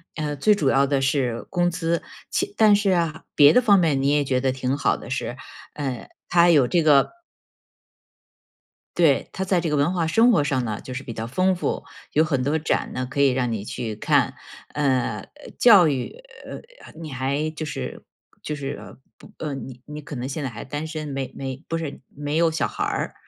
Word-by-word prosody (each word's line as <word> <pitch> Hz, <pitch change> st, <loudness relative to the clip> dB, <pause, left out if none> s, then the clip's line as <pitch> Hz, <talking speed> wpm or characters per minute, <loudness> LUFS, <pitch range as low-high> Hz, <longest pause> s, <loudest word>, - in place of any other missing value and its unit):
呃， 150 Hz, -2 st, -3 dB
最 210 Hz, +9 st, +4 dB
主 200 Hz, -9 st, 0 dB
要 135 Hz, +1 st, +4 dB
的 140 Hz, -1 st, 0 dB
是 130 Hz, -4 st, 0 dB
工 175 Hz, -1 st, +1 dB
资。 170 Hz, -1 st, -1 dB, 0.3 s
其 400 Hz, +1 st, -2 dB
但 215 Hz, -2 st, +6 dB
是 205 Hz, -1 st, +1 dB
啊， 165 Hz, -3 st, 0 dB
别 145 Hz, +1 st, +7 dB
的 250 Hz, -, +5 dB
方 205 Hz, -5 st, +5 dB
面 155 Hz, -6 st, +2 dB
你 140 Hz, -, +3 dB
也 145 Hz, 0 st, +2 dB
觉 130 Hz, -1 st, 0 dB
得 130 Hz, 0 st, +1 dB
挺 130 Hz, 0 st, -2 dB
好 140 Hz, -, +1 dB
的 -, -, -11 dB
是， -, -, -3 dB, 0.4 s
呃， 135 Hz, -5 st, -4 dB, 0.2 s
它 175 Hz, 0 st, +5 dB
有 145 Hz, -7 st, +5 dB
这 170 Hz, +5 st, +2 dB
个 145 Hz, -3 st, +5 dB, 1.9 s
对， 160 Hz, -6 st, +3 dB
它 190 Hz, -, -3 dB
在 185 Hz, -2 st, +1 dB
这 165 Hz, -, -2 dB
个 150 Hz, -, +1 dB
文 145 Hz, +5 st, +2 dB
化 170 Hz, -3 st, 0 dB
生 225 Hz, +10 st, +4 dB
活 170 Hz, -10 st, +3 dB
上 130 Hz, -3 st, 0 dB
呢， 110 Hz, -2 st, -4 dB
就 130 Hz, -, -8 dB
是 130 Hz, +2 st, -5 dB
比 115 Hz, -, -7 dB
较 110 Hz, 0 st, -5 dB
丰 185 Hz, +10 st, +1 dB
富， 175 Hz, -, -2 dB, 0.3 s
有 155 Hz, -, +4 dB
很 135 Hz, -5 st, 0 dB
多 150 Hz, +4 st, +1 dB
展 155 Hz, -, -1 dB
呢， 130 Hz, -, -2 dB
可 140 Hz, 0 st, -1 dB
以 140 Hz, -, +5 dB
让 125 Hz, -2 st, 0 dB
你 110 Hz, -3 st, -3 dB
去 110 Hz, +1 st, -5 dB
看。 105 Hz, -, +2 dB, 0.4 s
呃， 130 Hz, -7 st, 0 dB, 0.2 s
呃， 295 Hz, -, -13 dB
教 205 Hz, -8 st, +7 dB
育， 135 Hz, -4 st, -2 dB, 0.3 s
呃， -, -, -7 dB, 0.3 s
呃， -, -, -13 dB
你 160 Hz, -2 st, -7 dB
还 135 Hz, +4 st, -1 dB
就 155 Hz, 0 st, -5 dB
是 150 Hz, -, -6 dB, 0.4 s
就 150 Hz, -, -3 dB
是， 145 Hz, -1 st, -4 dB
呃， -, -, -12 dB, 0.2 s
不 -, -, -16 dB
呃， 150 Hz, -3 st, -4 dB
你 130 Hz, -2 st, -9 dB
你 150 Hz, 0 st, -8 dB
可 145 Hz, -1 st, -8 dB
能 125 Hz, +1 st, -4 dB
现 140 Hz, +2 st, -4 dB
在 135 Hz, -, -2 dB
还 115 Hz, -1 st, -8 dB
单 145 Hz, +4 st, -4 dB
身， 155 Hz, -1 st, -5 dB
没 135 Hz, -2 st, -4 dB
没 135 Hz, +1 st, -6 dB
不 165 Hz, -, -1 dB
是 160 Hz, -4 st, -6 dB
没 145 Hz, +1 st, -4 dB
有 165 Hz, 0 st, +3 dB
小 160 Hz, -, 0 dB
孩 -, -, -4 dB
儿。 -, -, -2 dB
145 Hz, 230 characters per minute, -23 LUFS, 135-165 Hz, 1.9 s, 别